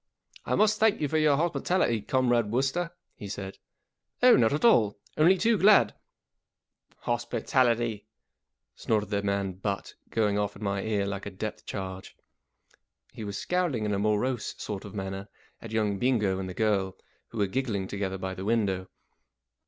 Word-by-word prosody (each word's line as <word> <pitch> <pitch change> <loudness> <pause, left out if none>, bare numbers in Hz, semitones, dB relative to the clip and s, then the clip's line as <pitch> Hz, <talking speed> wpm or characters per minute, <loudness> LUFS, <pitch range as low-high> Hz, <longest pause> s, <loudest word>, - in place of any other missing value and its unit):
" - - -23
I - - +2
must 215 0 +3
thank 220 -1 +3
you 150 - 0
for 155 +3 +1
your 150 -2 +4
hospitality. 170 - +1
Comrade 120 -2 +1
Wooster," 135 +9 0 0.2
he 105 - -9
said. 95 -1 -6 0.6
44 250 - +7
Oh, - - +8
not 115 -2 +4
at 150 - 0
all! 110 - +4 0.2
Only 170 +5 +5
too 225 +2 +2
glad 195 - +6
" - - -43 0.2
44 120 - +2
Hospitality! 120 -2 0 0.3
" - - -58
snorted 105 -2 -1
the 100 -1 +1
man 100 -1 -1
Butt, 100 +2 -4 0.2
going 105 -2 +1
off 105 0 -2
in 105 - -9
my 100 -1 -1
ear 105 -2 0
like 100 0 -4
a - - -3
depth 100 +2 -6
charge. 95 -1 -6 1.0
He 110 - -7
was 100 -1 -4
scowling 175 -11 0
in 105 - 0
a 100 - 0
morose 110 +4 0
sort 100 -1 -5
of 105 - -10
manner 95 0 -5 0.3
at 115 - -8
young 105 -3 0
Bingo 105 -7 +1
and 95 -1 -4
the 90 - -7
girl, 100 -4 0 0.3
who 115 - -10
were 105 - +2
giggling 105 -3 -2
together 95 -1 -3
by 95 0 -4
the 95 - -7
window. 100 -4 0
105 Hz, 180 wpm, -28 LUFS, 100-130 Hz, 1.0 s, Oh